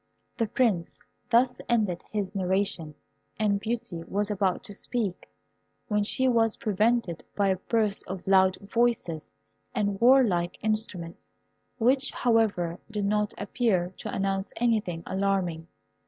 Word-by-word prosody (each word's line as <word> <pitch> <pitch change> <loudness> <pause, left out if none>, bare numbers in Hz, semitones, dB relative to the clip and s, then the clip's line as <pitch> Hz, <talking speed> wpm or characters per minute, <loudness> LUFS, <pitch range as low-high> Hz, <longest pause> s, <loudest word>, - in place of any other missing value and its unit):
The 230 -3 0
Prince 205 -8 0 0.3
thus 250 +1 +3
ended 210 -7 +1
his 205 -2 -3
narration, 190 -5 -1 0.4
and 205 -2 +1
Beauty 225 -5 -3
was 205 +1 -1
about 195 -1 0
to 215 -4 -6
speak, 205 -3 -3 0.6
when 210 -1 +2
she 260 +5 +1
was 225 -3 +3
prevented 215 -3 +1
by 200 -1 +2
a 190 - +2
burst 215 0 0
of 190 -1 -6
loud 190 -1 +4
voices 205 -7 -1 0.4
and 205 -1 -1
warlike 230 -9 +4
instruments, 210 -6 -3 0.4
which, 260 +4 +3
however, 210 -8 +1
did 210 -2 -2
not 210 +1 0
appear 200 -4 0
to - - -5
announce 195 0 -1
anything 215 -8 0
alarming. 190 -4 -1
205 Hz, 125 wpm, -27 LUFS, 185-230 Hz, 0.6 s, loud